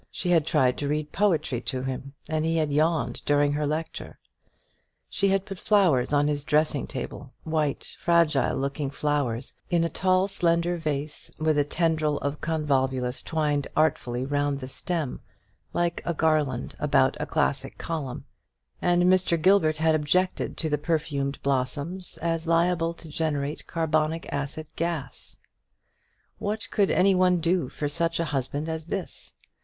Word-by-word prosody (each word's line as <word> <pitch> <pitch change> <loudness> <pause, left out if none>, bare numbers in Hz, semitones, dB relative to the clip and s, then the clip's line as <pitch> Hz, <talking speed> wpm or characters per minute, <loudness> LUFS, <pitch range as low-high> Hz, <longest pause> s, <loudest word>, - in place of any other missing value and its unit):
She 180 - -2
had 165 -3 +3
tried 130 -6 +2
to 145 - -2
read 150 +1 -2
poetry 165 - +1
to 130 +1 -3
him, 135 +1 -5
and 155 -1 -1
he 165 +1 +1
had 155 -2 0
yawned 150 -5 +1
during 145 0 +3
her 150 0 0
lecture. 155 +2 -4 0.9
She 200 - +1
had 195 0 +1
put 195 -3 -7
flowers 175 - +3
on 145 0 +3
his 145 -1 0
dressing 150 -1 +1
table 135 0 -7
white 155 -3 -2
fragile 170 -4 +3
looking 140 +1 -2
flowers 140 -4 -1 0.2
in 170 -2 +2
a 165 - 0
tall 185 +3 +2
slender 175 -2 +1
vase 150 -2 -3
with 155 0 +1
a 145 - +3
tendril 155 -1 +1
of 145 +1 -3
convolvulus 135 -5 0
twined 150 -3 0
artfully 130 -5 +1
round 145 0 0
the 130 - -6
stem, 155 0 -2 0.5
like 175 0 0
a 170 - -2
garland 150 -6 +1
about 135 -3 +3
a 150 - -3
classic 140 -3 0
column; 145 -7 -4 0.6
and 175 0 +3
Mr. 180 -2 +3
Gilbert 160 -3 +4
had 160 0 +3
objected 155 +5 0
to 160 - -2
the 150 -2 0
perfumed 150 -4 -1
blossoms 140 +7 -1
as 165 -1 -1
liable 170 0 +2
to 165 - -12
generate 150 -2 -2
carbonic 160 0 0
acid 145 +2 -3
gas. 165 -5 -4 1.0
What 215 +2 -2
could 200 -2 +2
any 195 +1 +4
one 180 -1 +4
do 170 -4 +1
for 145 - -3
such 165 +3 0
a 170 - +1
husband 140 +3 -2
as 160 0 -3
this? 190 +1 -4
155 Hz, 155 wpm, -26 LUFS, 145-170 Hz, 1.0 s, Gilbert